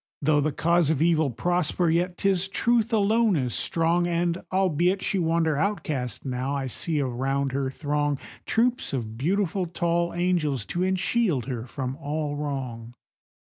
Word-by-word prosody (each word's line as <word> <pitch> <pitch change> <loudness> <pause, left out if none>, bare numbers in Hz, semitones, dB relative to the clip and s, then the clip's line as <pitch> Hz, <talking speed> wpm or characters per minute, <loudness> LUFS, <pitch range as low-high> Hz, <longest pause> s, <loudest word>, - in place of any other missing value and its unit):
Though 150 0 +3
the 155 +2 0
cause 170 0 +2
of 160 -4 +1
Evil 160 -2 +3
prosper, 175 +5 0
yet 175 +2 +1
'tis 190 -2 +1
Truth 230 +3 +1
alone 220 0 +3
is 125 -5 -1
strong, 170 +1 +1
And, 170 0 0
albeit 185 0 +2
she 195 - 0
wander 165 -2 +1
outcast 155 - -2
now, 130 +2 -2
I 135 -1 -2
see 150 +5 -2
around 135 +1 -1
her 135 0 -1
throng 145 0 -1 0.3
Troops 240 - +1
of 110 -4 -3
beautiful, 185 - 0
tall 170 0 0
angels, 165 - 0
to 175 - -2
enshield 185 - +1
her 125 -2 -4
from 130 +1 -4
all 150 0 -3
wrong. 130 -5 -5
160 Hz, 150 wpm, -26 LUFS, 140-180 Hz, 0.3 s, Though